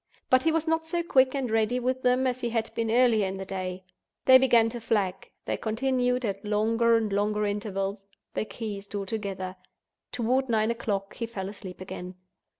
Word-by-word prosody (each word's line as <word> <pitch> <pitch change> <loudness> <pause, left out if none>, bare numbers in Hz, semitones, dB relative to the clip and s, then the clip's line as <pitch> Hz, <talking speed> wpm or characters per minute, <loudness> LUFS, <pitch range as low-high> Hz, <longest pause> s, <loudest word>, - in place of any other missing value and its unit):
But 255 0 +6
he 320 - +2
was 325 0 0
not 320 0 +1
so 340 +1 -1
quick 260 -4 +3
and 260 -4 -2
ready 225 +2 +2
with 255 +1 -1
them 255 +1 +3
as 255 0 -1
he 240 - -1
had 225 -1 -2
been 230 -1 -1
earlier 230 -3 +4
in 190 +1 -4
the 190 - -5
day. 185 -1 -4 0.4
They 260 0 +9
began 235 -3 +5
to 240 0 -7
flag—they 195 -4 -2
continued, 250 +2 0
at 200 -2 -3
longer 225 +2 +3
and 215 -3 -1
longer 210 +1 +1
intervals—they 200 0 -4
ceased 205 -3 -6
altogether. 195 -2 -4 0.5
Toward 255 +2 0
nine 220 0 +2
o'clock 200 -4 -3
he 230 - -3
fell 195 -4 -5
asleep 190 -3 -10
again. 185 0 -7
225 Hz, 175 wpm, -27 LUFS, 200-250 Hz, 0.5 s, They